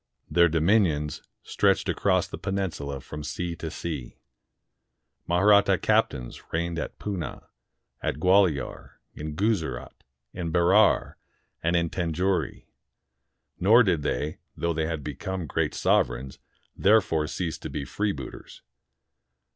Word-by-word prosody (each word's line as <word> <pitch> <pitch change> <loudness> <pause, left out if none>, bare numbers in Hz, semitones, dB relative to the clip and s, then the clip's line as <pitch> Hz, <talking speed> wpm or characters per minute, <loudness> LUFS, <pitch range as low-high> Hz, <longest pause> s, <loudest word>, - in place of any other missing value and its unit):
Their 85 0 +5
dominions 80 -3 +2 0.2
stretched - - +2
across - - +1
the - - -8
peninsula 80 -8 -3
from 75 +3 -8
sea 85 +3 -3
to 80 - -5
sea. 75 -6 -6 1.1
Mahratta 100 +2 +5
captains 75 - 0
reigned 85 0 -1
at - - -5
Poonah, 95 -6 -5 0.5
at - - -1
Gualior, 90 -4 +2 0.2
in 75 0 -6
Guzerat, 80 - -1 0.4
in 85 -2 -4
Berar, 95 +5 +4 0.4
and 85 +2 +1
in 85 -1 +1
Tanjore. 90 +2 -1 0.9
Nor 110 +7 +6
did 90 -7 +1
they, 75 +1 -2 0.2
though 85 0 0
they 80 0 -1
had 80 -3 -3
become 90 +5 -4
great 75 - -1
sovereigns, 65 +2 +1 0.4
therefore 95 -7 +3
cease 85 -1 -3
to - - -6
be 70 - -4
freebooters. 100 +9 -5
85 Hz, 115 wpm, -26 LUFS, 75-95 Hz, 1.1 s, Nor